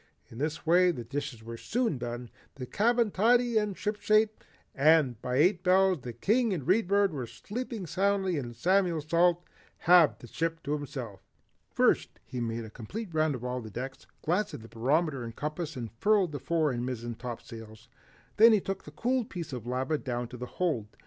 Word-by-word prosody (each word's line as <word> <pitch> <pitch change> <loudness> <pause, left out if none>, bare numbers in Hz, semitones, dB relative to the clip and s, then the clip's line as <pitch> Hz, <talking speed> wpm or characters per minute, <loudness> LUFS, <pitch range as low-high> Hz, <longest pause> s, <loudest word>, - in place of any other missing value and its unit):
In 115 - -10
this 150 +2 -3
way 180 +2 +5
the 140 -9 -3
dishes 135 -1 -5
were 115 +1 -7
soon 230 - -1
done, 120 0 -5 0.2
the 130 - -6
cabin 230 - +2
tidy 235 +3 +3
and 210 -3 -3
shipshape, 215 +1 +1 0.3
and 140 -5 +3
by 125 - -2
eight 175 +6 +3
bells 185 -3 +4
the 120 - -6
King 215 - +1
and 160 -7 -3
the - - -14
Read 195 +3 +3
Bird 200 -2 +3
were 130 -5 -4
sleeping 210 - -6
soundly 190 -1 +1
and 120 -3 -6
Samuel 180 +4 +2
Salt 170 +3 +2 0.3
had 175 -3 +5
the - - -12
ship 165 +6 -3
to 145 - -2
himself. 130 - -5 0.5
First, - - +1
he 125 - -5
made 115 0 -3
a 110 - -11
complete 180 - -7
round 155 -2 +2
of 125 - -8
all 125 0 -3
decks, 125 +4 -7 0.2
glanced 185 +6 0
at 110 - -10
the - - -11
barometer 135 +4 0
and 115 -1 -7
compass, 155 +1 -4
and 120 -3 -5
furled 205 -5 +3
the 145 - -5
fore 160 0 +1
and 120 -1 -3
mizzen 120 -2 -4
topsails. 115 -2 -9 0.5
Then 225 +1 +8
he 215 - +5
took 195 0 -5
the - - -9
cooled 240 - -1
piece 170 -6 -6
of 120 -2 -6
lava 130 +5 -1
down 120 -1 -3
to 125 - -9
the 125 +1 -6
hold. 155 -13 0
155 Hz, 195 wpm, -29 LUFS, 125-190 Hz, 0.5 s, Then